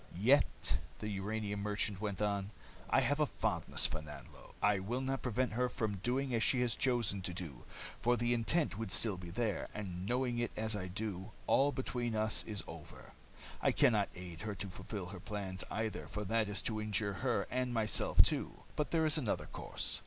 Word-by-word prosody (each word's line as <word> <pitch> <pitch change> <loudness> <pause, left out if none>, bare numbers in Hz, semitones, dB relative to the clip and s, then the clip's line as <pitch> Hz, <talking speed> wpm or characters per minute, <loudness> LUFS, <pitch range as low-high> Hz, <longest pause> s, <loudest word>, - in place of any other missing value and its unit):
"Yet," 130 +9 +3 0.2
the 105 - -4
uranium 105 +1 -2
merchant 105 -1 -1
went 105 -1 -1
on, 100 -1 0 0.4
"I - - +5
have 145 +1 +1
a 150 - +4
fondness - - 0
for 75 - 0
Nanlo. 75 -1 -11
I 105 -1 +4
will 115 +7 -2
not 135 0 -1
prevent 125 0 0
her 125 +2 +1
from 110 -4 -1
doing 125 +6 0
as 115 - +2
she 125 +2 +3
has 120 -2 +2
chosen 120 -7 +1
to 90 -1 -3
do, 80 -9 -7 0.3
for 120 +1 +3
the 120 +1 +2
intent 120 - +1
would 115 -4 -3
still 110 -2 +2
be 90 -1 -8
there, 105 +2 -1
and 95 -3 -4
knowing 125 0 +1
it 120 -2 +1
as 110 0 0
I 95 -3 -3
do, 100 +1 -4
all 140 +2 +4
between 120 -4 -2
us 110 0 +2
is 105 -3 -4
over. - - -10 0.5
I - - +4
can 120 - +5
not 105 -2 +2
aid 90 -2 -7
her 105 -2 -3
to 100 +1 -4
fulfill 95 +1 -5
her 95 - -7
plans, 95 -2 -3
either, 110 -1 -2
for 105 - -4
that 110 +1 +1
is 100 -1 0
to 110 -2 -1
injure 105 -1 +1
her 125 -2 +1
and 125 0 0
myself 110 -3 +5
too. - - -1
But 150 - 0
there 160 -1 +3
is 155 0 +4
another 120 -8 -1
course. - - -2
110 Hz, 200 wpm, -35 LUFS, 100-120 Hz, 0.5 s, I